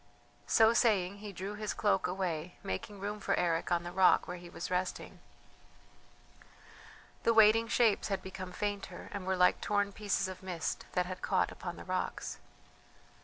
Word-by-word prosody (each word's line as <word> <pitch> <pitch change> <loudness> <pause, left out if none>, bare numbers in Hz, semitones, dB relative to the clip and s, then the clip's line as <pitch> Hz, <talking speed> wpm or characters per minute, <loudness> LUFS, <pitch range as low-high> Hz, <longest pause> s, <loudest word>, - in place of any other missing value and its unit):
So 225 0 +5
saying 200 -5 +2
he 210 0 -7
drew 195 +2 -5
his 210 0 -4
cloak 205 -3 +2
away, 180 -2 -3
making 195 - -5
room 205 +2 -4
for - - 0
Eric 170 -1 0
on 170 -1 +2
the 175 - -6
rock 185 0 +4
where 180 - -5
he 175 0 -11
was 170 - -6
resting. 180 0 -2 2.0
The 230 - +2
waiting 220 +1 +6
shapes 225 -3 +3
had 195 -2 -2
become 185 -1 -7
fainter, 205 +1 -4
and 195 -2 -5
were 190 0 +1
like 180 0 +4
torn 205 -1 +1
pieces 200 -2 -1
of 185 -1 -8
mist 180 -3 -4
that 180 -1 +1
had 185 0 -6
caught - - +1
upon - - -6
the - - -9
rocks. - - -3
190 Hz, 170 wpm, -32 LUFS, 180-210 Hz, 2.0 s, waiting